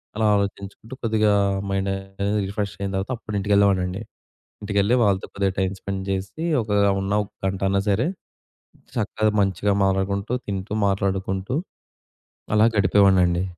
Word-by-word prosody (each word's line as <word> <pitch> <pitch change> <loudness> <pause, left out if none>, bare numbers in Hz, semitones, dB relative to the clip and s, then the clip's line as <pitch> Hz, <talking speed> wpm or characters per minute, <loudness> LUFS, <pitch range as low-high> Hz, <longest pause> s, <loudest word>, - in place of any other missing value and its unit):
అలా 110 0 +1
ఆలోచించుకుంటూ 100 +4 -4
కొద్దిగా 110 -2 +2 0.4
మైండ్ 95 0 -1
అనేది 95 +2 -2
రిఫ్రెష్ 100 0 -3
అయిన 100 -1 -2
తర్వాత, 95 +6 -2
అప్పుడు 105 -2 -7
ఇంటికెళ్ళేవాడినండి. 100 -1 +2 0.6
ఇంటికెళ్ళి 100 +3 +2
వాళ్ళతో 95 -2 +1
కొద్దిగా 100 -1 0
టైమ్ 95 0 0
స్పెండ్ 95 -1 -4
జేసి, 95 - -3 0.2
ఒక 105 - -9 0.3
ఉన్న 95 +1 -2
ఒక - - -17 0.2
గంట‌న్నా 95 +1 0
సరే 110 +8 +2 0.9
చక్కగ 110 0 0
మంచిగా 100 +1 +1
మాట్లాడుకుంటూ, 100 +3 0 0.2
తింటూ 100 +1 -3
మాట్లాడుకుంటూ, 95 +3 -1 1.0
అలా 110 +1 +6
గడిపేవాడినండి. 95 -3 +4
100 Hz, 125 wpm, -23 LUFS, 95-105 Hz, 1.0 s, అలా